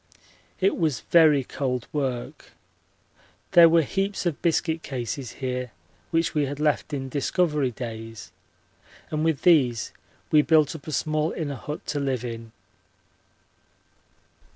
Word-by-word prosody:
It 195 +1 +2
was 155 -6 0
very 155 -5 +6
cold 125 -2 -3
work. 130 -5 -4 1.0
There 170 -1 +8
were 165 0 +4
heaps 195 +6 -2
of 165 -4 -1
biscuit 165 -1 +1
cases 130 -1 -5
here 125 -2 -4 0.4
which 165 0 +1
we 150 -2 +1
had 145 +1 -5
left 150 0 0
in 135 -2 -3
Discovery 150 +1 0
days, 115 -3 -8 0.8
and 155 0 -1
with 160 -4 0
these 130 -10 +3 0.4
we 150 - +6
built 155 -1 +3
up 155 - -11
a - - -4
small 155 +1 0
inner 150 -5 -3
hut 150 +3 -7
to 145 - -2
live 130 -3 -1
in. 115 -1 -7
145 Hz, 130 wpm, -25 LUFS, 125-160 Hz, 1.0 s, There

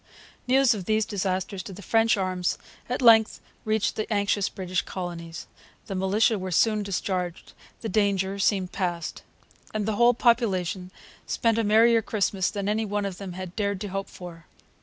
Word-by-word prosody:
News 260 -1 +5
of 200 -4 -5
these 215 +1 +1
disasters 190 -1 -2
to 195 - -9
the 200 +2 -10
French 225 +1 +3
arms 185 -2 -1 0.3
at 250 +1 -2
length 225 -2 +6 0.3
reached 220 0 0
the 215 +1 -4
anxious 205 -1 +1
British 185 -2 -2
colonies. 170 -2 -6 0.4
The - - -5
militia 200 +4 +2
were 185 0 -4
soon 215 +4 +2
discharged. 185 -3 -3 0.3
The 225 - -3
danger 200 -1 +1
seemed 190 -2 +1
past. 175 -4 -3 0.5
And 210 -1 0
the 215 -1 -1
whole 240 0 +5
population 195 -7 +1 0.4
spent 230 -2 +1
a - - +2
merrier 225 +2 +5
Christmas 200 -3 0
than 200 -2 -4
any 215 +2 +1
one 205 -1 -2
of 190 -2 -5
them 195 -3 -6
had 185 -1 -7
dared 200 -3 -1
to 205 - -4
hope 195 +1 -4
for. 170 -2 -11
200 Hz, 170 wpm, -26 LUFS, 185-220 Hz, 0.5 s, length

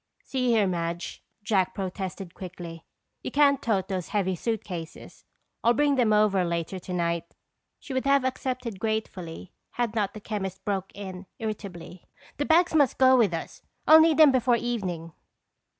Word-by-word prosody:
"See 255 -2 -1
here, 225 -3 +4
Madge," 170 -1 -3 0.2
Jack 195 -3 +1
protested 190 -1 -5
quickly. 170 -3 -9 0.3
"You - - -4
can't 280 -1 +4
tote 200 -5 0
those 185 -4 -3
heavy 190 -3 0
suitcases. 180 -5 -5 0.4
I'll 235 +1 +4
bring 290 +1 +3
them 245 -5 +2
over 210 -3 +3
later 170 +2 -2
tonight." 170 -2 -3 0.4
She 285 - -8
would 260 0 -1
have 275 -1 +3
accepted 255 -5 -3
gratefully 190 -6 -4 0.2
had 240 -3 -1
not 210 -3 -1
the - - -6
chemist 195 -3 -5
broke 195 -2 -2
in 190 -2 -8
irritably: 200 -5 -6 0.3
"The 290 - -1
bags 335 +3 +4
must 290 -5 +3
go 260 0 +6
with 225 -7 +4
us. 165 -1 -6 0.2
I'll 315 +1 +9
need 320 -2 +4
them 310 -3 +8
before 250 -1 +3
evening." 185 -9 -3
205 Hz, 155 wpm, -27 LUFS, 180-250 Hz, 0.4 s, I'll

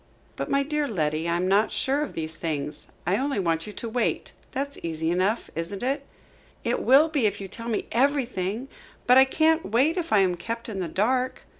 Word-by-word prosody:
"But - - -4
my 275 0 +2
dear 300 0 -1
Letty, 155 - -1
I 170 - +1
am 180 +2 0
not 200 +3 +3
sure 275 +2 +1
of 300 - -3
these 160 -1 -4
things. 150 -3 -4 0.2
I 180 +4 +2
only 275 +1 -1
want 165 -2 0
you 210 - -7
to 230 - -5
wait. 235 +1 -1 0.2
That's 280 +1 -3
easy 160 0 -2
enough, 190 +6 0
isn't 170 +6 -4
it?" 275 +2 -1 0.6
"It - - 0
will 275 +5 +6
be, 290 -8 +2
if 205 0 -3
you 195 - -6
tell 230 +4 -8
me 220 - -1
everything. 245 -4 0 0.4
But 250 +2 +7
I 265 - +8
can't 320 +4 +2
wait 270 - +3
if 335 -2 -2
I 215 - +5
am 185 -2 +2
kept 230 +6 -5
in 200 -3 -4
the 180 - -2
dark." 250 +9 0
225 Hz, 210 wpm, -26 LUFS, 180-270 Hz, 0.6 s, I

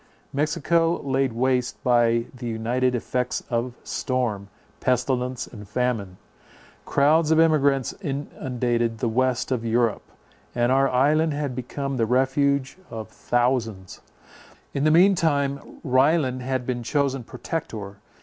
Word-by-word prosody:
Mexico 165 +3 +1
laid 135 -1 +1
waste 125 +1 0
by 115 -1 +3
the 125 -1 -7
united 120 +3 0
effects 125 +1 -2
of 120 +1 -1
storm, 115 -6 -2 0.3
pestilence 125 0 0
and 105 -4 -12
famine. 110 -6 -1 0.7
Crowds 150 +3 +3
of 160 0 +4
emigrants 140 -5 +3
inundated 125 - -2
the 120 - -1
west 130 +2 0
of 125 -3 0
Europe; 115 -1 +1 0.5
and 120 0 +2
our 135 +1 +4
island 150 +4 +2
had 145 -4 -3
become 135 +2 -4
the 115 -2 +1
refuge 135 +4 +1
of 110 -1 -7
thousands. 120 -6 -1 0.7
In 140 +1 0
the - - +5
mean 180 +5 +6
time 140 -6 -1
Ryland 130 0 +2
had 130 0 -2
been 120 -1 -2
chosen 135 0 0
Protector. 115 - -6
130 Hz, 125 wpm, -24 LUFS, 120-140 Hz, 0.7 s, mean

